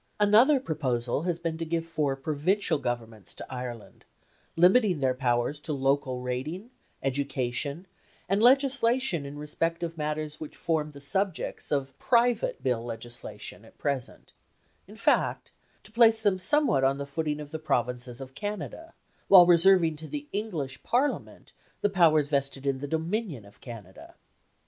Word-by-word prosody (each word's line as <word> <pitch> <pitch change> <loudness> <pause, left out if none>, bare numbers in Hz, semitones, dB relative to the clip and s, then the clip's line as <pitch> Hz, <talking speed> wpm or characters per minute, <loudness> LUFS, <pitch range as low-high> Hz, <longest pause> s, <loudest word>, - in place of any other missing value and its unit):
Another 225 +8 +5
proposal 130 - -1
has 170 - 0
been 165 -1 -4
to - - -2
give 165 0 -2
four 150 -4 -1
provincial 155 +5 0
Governments 115 -5 -5
to - - -7
Ireland, 125 -3 -7 0.5
limiting 180 0 +4
their 130 -2 +2
powers 125 +2 0
to 155 0 -4
local 135 -2 0
rating, 150 - -4 0.3
education, 140 +3 -2 0.4
and 195 +3 +1
legislation 255 - +3
in 145 +1 -8
respect 165 +3 -2
of 165 -1 -5
matters 150 0 -3
which 155 - -8
form 160 -3 -1
the 140 -1 -12
subjects 190 +5 -2
of 135 -2 -1
private 240 - +2
Bill 125 -4 0
legislation 115 -3 -6
at 110 - -19
present; 140 -4 -4 0.5
in - - -13
fact, - - +1 0.3
to 215 - -14
place 225 -1 +5
them 195 -3 +2
somewhat 185 - +2
on 135 +1 +2
the 140 - -4
footing 150 +1 -3
of 150 -1 -8
the 160 - -4
provinces 125 -4 -2
of 135 -1 -9
Canada, 210 - -6 0.3
while 185 -3 +9
reserving 175 -2 +5
to 155 +1 -5
the 295 0 -6
English 165 -11 -3
Parliament 265 +4 -2 0.3
the 205 - +1
powers 160 -6 +4
vested 140 -1 -1
in 135 -1 0
the 145 - -5
Dominion 160 - -2
of 100 0 -18
Canada. 105 -7 -11
150 Hz, 150 wpm, -28 LUFS, 135-190 Hz, 0.5 s, while